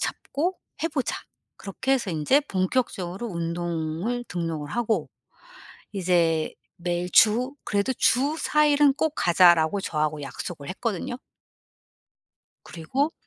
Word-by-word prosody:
잡고 350 +6 -2 0.3
해 - - +2
보자.' 290 -5 -2 0.4
그렇게 220 +7 -2
해서 245 -7 0
인제 165 - +3
본격적으로 190 -2 -2
운동을 170 +5 -3
등록을 165 -4 -3
하고 235 -2 0 0.8
이제 170 -4 +1 0.2
매일 175 0 -2
주 245 +5 +4
'그래도 205 +5 0
주 275 +7 +2
4 300 -1 +3
일은 290 -1 +4
꼭 315 +1 0
가자.'라고 175 +1 +5
저하고 155 -3 -1
약속을 140 +2 -7
했거든요. 230 +3 -3 1.5
그리고 265 - -2
190 Hz, 245 characters per minute, -25 LUFS, 170-255 Hz, 1.5 s, 가자.'라고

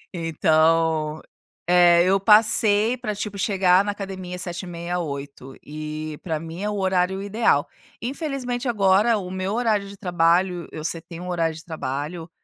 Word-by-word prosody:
Então, 160 -1 +1 0.4
é, 175 -1 +6
eu 195 +1 +3
passei 215 +2 +4
pra 215 -4 -4
tipo 205 0 -5
chegar 190 -1 +3
na 205 - -1
academia 190 -3 -6
7:30, 175 -1 -4
8:00. 140 -4 -7
E 155 0 -6
pra 160 -3 -3
mim 165 +3 -8
é 210 - -1
o 210 - -3
horário 190 0 +1
ideal. 200 -7 +1 0.3
Infelizmente, 260 -2 -3
agora 210 0 +3
o 185 -3 -6
meu 190 +2 -3
horário 215 -4 +1
de 200 - -11
trabalho 175 -1 +1
eu 155 - -7
setei 165 +1 -5
um 180 +1 -7
horário 165 -2 0
de 160 - -12
trabalho 155 +2 -5
180 Hz, 150 wpm, -23 LUFS, 165-205 Hz, 0.4 s, é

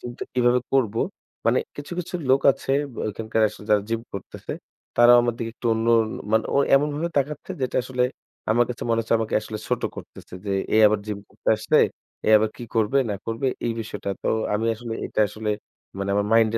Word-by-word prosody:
Gym 120 - -6
টা - - -3
কিভাবে 125 0 +3
করবো। 115 -5 +2 0.5
মানে 120 +2 +4 0.2
কিছু, 145 +3 -7
কিছু, 180 0 -5 0.2
লোক 135 +1 +5
আছে 135 - -3 0.2
ব্যা - - -5
ওইখানকার 110 +1 -2
আসলে 105 - -12
যারা 105 -1 +4
gym 115 0 -1
করতেছে। 100 - -7 0.4
তারাও 120 +1 +8
আমার 120 -1 0
দিকে 115 -1 -3
একটু 120 - -5
অন্যন 115 0 +4 0.3
মানে 110 0 +3
ও - - +4 0.2
এমনভাবে 150 +4 +1
তাকাচ্ছে 145 +1 -3
যেটা 130 - -1
আসলে 125 0 -1 0.5
আমার 120 +2 +4
কাছে 125 - -5
মনে 115 - +2
হচ্ছে 115 0 0
আমাকে 110 -1 -2
আসলে 105 0 -6
ছোট - - 0
করতেছে। - - -11
যে 100 - 0 0.2
এ - - +5
আবার 105 0 +1
gym 105 -1 -3
করতে - - -6
আসছে, - - +1 0.5
এ - - +3
আবার 110 0 0
কি - - -9
করবে 110 +4 +2
না - - -1
করবে 115 +4 -2 0.2
এই 115 - +1
বিষয়টা। 110 -2 -6
তো - - -1 0.3
আমি 110 +2 0
আসলে 115 0 -7
এটা - - -1
আসলে 110 +2 -5 0.5
মানে 100 0 -2
আমার 100 0 +1
mind 115 -1 +5
115 Hz, 205 wpm, -24 LUFS, 110-125 Hz, 0.5 s, তারাও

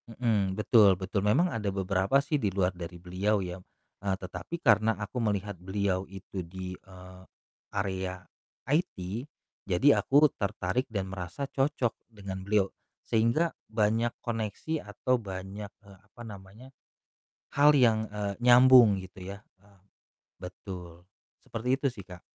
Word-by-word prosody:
Mhm, 105 -5 0
betul 105 -3 +5
betul. 95 +2 -2
Memang 140 - +3
ada 105 -3 -1
beberapa 95 +5 +1
sih 145 -1 0
di 105 - +1
luar 95 -1 0
dari 90 0 -8
beliau 95 +4 0
ya, 90 0 -5 0.4
eee, 95 -1 0
tetapi 95 - -6
karena 115 -6 +3
aku 105 +4 -4
melihat 105 -2 -1
beliau 95 0 -1
itu 95 0 -7
di, 90 +1 -7
eee, 95 0 -13 0.5
area 95 -2 -3 0.4
IT, 150 +1 0 0.7
jadi 115 +11 +4
aku 145 +3 +5 0.2
tertarik 100 +4 -1
dan 100 -4 -2
merasa 95 +8 -5
cocok 135 -4 0 0.2
dengan 100 -4 -7
beliau. 100 0 +2 0.4
Sehingga 115 +9 +2 0.2
banyak 110 +2 +1
koneksi 115 +7 -3
atau 125 +4 0
banyak, 95 +1 -7 0.2
eee, 100 -1 -15
apa 105 +4 -16
namanya, 105 +5 -12 0.8
hal 145 +1 +7
yang, 110 -4 +3
eee, 100 -1 -3
nyambung 125 -4 +7
gitu 95 0 -9
ya, - - -14 0.2
eee, 100 -2 -24 0.6
betul. 90 -2 -9 0.4
Seperti 115 +2 -5
itu 140 +1 -1
sih, 105 -6 -11
Kak. 90 -2 -11
100 Hz, 135 wpm, -29 LUFS, 95-115 Hz, 0.8 s, hal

